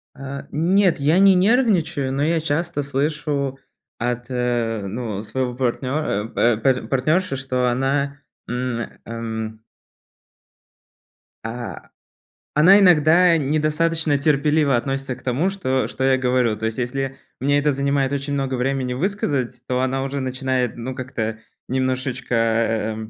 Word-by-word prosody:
Э, 135 0 -6
нет, 180 +3 +2
я 155 +6 +3
не 195 -1 +7
нервничаю, 180 - +2
но 140 +2 0
я 165 +1 +2
часто 160 0 -1
слышу 140 -1 -2 0.4
от, 120 0 -2
э, 120 -4 -1
ну, 110 -1 -4
своего 125 +2 -2
партнёра, 125 -3 -1
э, 120 -2 +3
па 130 +4 +3
па - - -10
партнёрши, 155 +5 +1
что 130 -2 0
она, 140 +3 0 0.3
м, 125 0 -2 0.3
эм 110 -1 -5 1.8
а, 115 +1 -6 0.6
она 180 +7 +7
иногда 175 -1 +5
недостаточно 155 +1 +1
терпеливо 145 0 +2
относится 135 +1 -2
к 125 - -18
тому, 135 +9 +1
что 130 -10 -1
что 130 - -4
я 130 0 +4
говорю. 125 -4 +1
То 110 - -4
есть 110 0 -2
если 135 +2 -3 0.2
мне 145 +2 +2
это 145 +1 +2
занимает 140 0 0
очень 140 0 -2
много 135 -2 -1
времени 130 0 -1
высказать, 140 - -2
то 125 0 0
она 130 +1 0
уже 140 +1 -3
начинает, 130 -2 -1
ну, 120 +2 -5
как-то 115 -4 -4 0.3
немножечко, 130 -1 -1
э, 115 -1 +1
135 Hz, 135 wpm, -21 LUFS, 125-150 Hz, 1.8 s, не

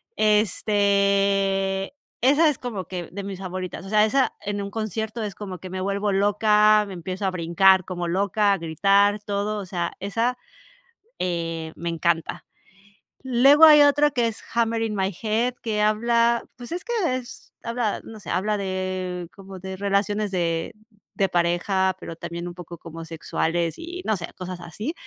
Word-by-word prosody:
este, 200 -1 +2 0.3
esa 290 +5 +5
es 290 - -2
como 220 -8 -5
que 175 0 -6
de 200 +2 -6
mis 195 -1 -6
favoritas, 185 0 -6
o - - -8
sea, 210 0 +4
esa 260 +5 +1
en 205 0 -3
un 200 0 -5
concierto 220 +1 -3
es 210 -3 -4
como 190 -4 -7
que 185 - -9
me 185 +1 -4
vuelvo 200 +2 -1
loca, 210 +1 +4
me 195 - -7
empiezo 185 +3 -5
a - - 0
brincar 185 +2 +4
como 175 -2 -4
loca, 200 +3 +2
a - - 0
gritar, 200 +5 +2
todo, 205 +1 -2
o 200 - -6
sea, 175 -2 -3
esa, 230 +6 -1 0.9
eh, 165 -2 -2
me 170 - -4
encanta. 165 0 -1 0.8
Luego 270 +5 +6
hay 300 -2 +9
otro 290 0 +4
que 240 -2 +2
es 225 - -6
"Hammering 225 -2 0
My 195 0 -1
Head", 230 +3 0
que 215 -2 -1
habla, 235 +2 +2
pues, 245 +2 -10
es 355 +2 -4
que 475 - -3 0.2
es 250 -2 -11
habla, 230 -2 -1
no 220 -1 -10
sé, 190 - -10
habla 210 +3 0
de 185 -2 -3
como 195 -1 -10
de 190 +1 -6
relaciones 200 +1 0
de 165 -3 -1 0.4
de 195 - +2
pareja, 175 +2 +1
pero 165 - -7
también 170 +1 -6
un 175 - -6
poco 175 -1 -10
como 165 0 -9
sexuales 165 +1 -2
y, 345 +2 -7
no 220 - +1
sé, 170 - -5
cosas 185 -1 -6
así, 210 - -5
200 Hz, 170 wpm, -24 LUFS, 180-215 Hz, 0.9 s, hay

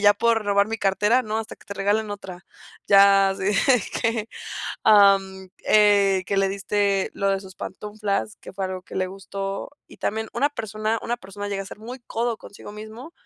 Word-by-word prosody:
"¿Ya 205 0 +6
pueden 225 0 +2
robar 200 0 +3
mi 225 +1 -4
cartera?, 210 +5 +2
no, 215 -1 -3
hasta 225 - -6
que - - -22
te 200 - -6
regalen 205 +2 0
otra". 190 -2 -8 0.4
Ya 195 0 +6
así 195 - -5
de 210 +3 +3 0.2
que 225 -2 0 0.6
am, 195 -2 +5 0.2
eh, 200 -3 +5
que 200 - -2
le 195 0 +3
diste 200 0 0
lo 200 0 0
de 195 0 0
sus 190 -1 -13
pantuflas, 210 0 -4
que - - -12
fue 190 0 -3
algo 185 -1 -5
que - - -13
le 185 0 -1
gustó. 195 +2 -5 0.2
Y - - -14
también 220 +1 -2
una 280 +5 +2
persona 220 -3 -3
una 240 - -2
persona 205 -2 -7
llega 195 -1 -2
a - - -11
ser - - -10
muy 245 +4 -8
codo 230 0 -1
consigo 205 - -12
mismo, 220 +9 -10
205 Hz, 195 wpm, -24 LUFS, 195-220 Hz, 0.6 s, Ya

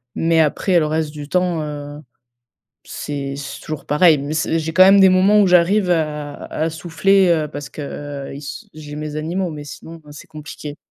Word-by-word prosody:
Mais 165 0 +2
après, 170 +3 +2
le 155 - 0
reste 155 0 -1
du 150 -1 -8
temps, 180 -1 0
heu, 145 0 -7 0.8
c'est 140 -1 -5
c'est 140 -2 -7
toujours 155 -2 -6
pareil. 155 0 +4
Mais 145 +3 -4
c'est 160 +1 0
j'ai 160 0 -3
quand 185 - +6
même 195 +1 +7
des 190 - +7
moments 195 +3 +4
où - - +3
j'arrive 180 +2 +3
à 150 -3 -1
à 160 +1 -2
souffler, 180 +4 +2
heu, 160 -3 +2
parce 145 -1 -7
que 145 -1 -7
ils - - -8
s 145 - -8
j'ai 150 -1 -9
mes 150 0 -5
animaux, 175 +4 -2
mais 150 -2 -8
sinon, 165 +3 -10
heu, - - -13
c'est 145 - -12
compliqué. 150 -1 -9
155 Hz, 200 wpm, -19 LUFS, 145-175 Hz, 0.8 s, même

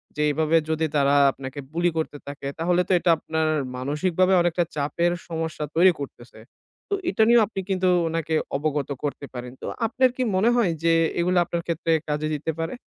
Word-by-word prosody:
যে 150 - -2
এইভাবে 155 +2 +1
যদি 160 0 0
তারা 140 0 +3 0.2
আপনাকে 135 +1 -8
bully 175 +1 +2
করতে 155 -2 -2
থাকে 140 -1 -6
তাহলে 175 +2 +2
তো - - -2
এটা 175 - 0
আপনার 160 0 -1 0.3
মানসিকভাবে 165 +8 +1
অনেকটা 175 0 +1
চাপের 165 +4 0 0.2
সমস্যা 160 -2 -3
তৈরি 180 +3 +6
করতেছে। 120 -5 -9 0.5
তো 405 - -1 0.2
এটা 220 - +2
নিয়েও 235 -1 +6
আপনি 200 -2 -6
কিন্তু 185 -1 +1 0.2
উনাকে 165 0 -2 0.2
অবগত 145 -1 -2
করতে 145 -1 -3
পারেন। 125 -1 -6
তো - - -6 0.2
আপনার 255 +2 +3
কি 255 - -1
মনে 205 +5 +3
হয় 225 -8 +2
যে, 165 0 +4 0.3
এগুলা 180 +1 +2
আপনার 170 0 -3
ক্ষেত্রে 165 0 -1 0.2
কাজে 150 +1 -1
দিতে 150 +2 -2
পারে? 165 +1 -2
165 Hz, 180 wpm, -24 LUFS, 150-180 Hz, 0.5 s, তৈরি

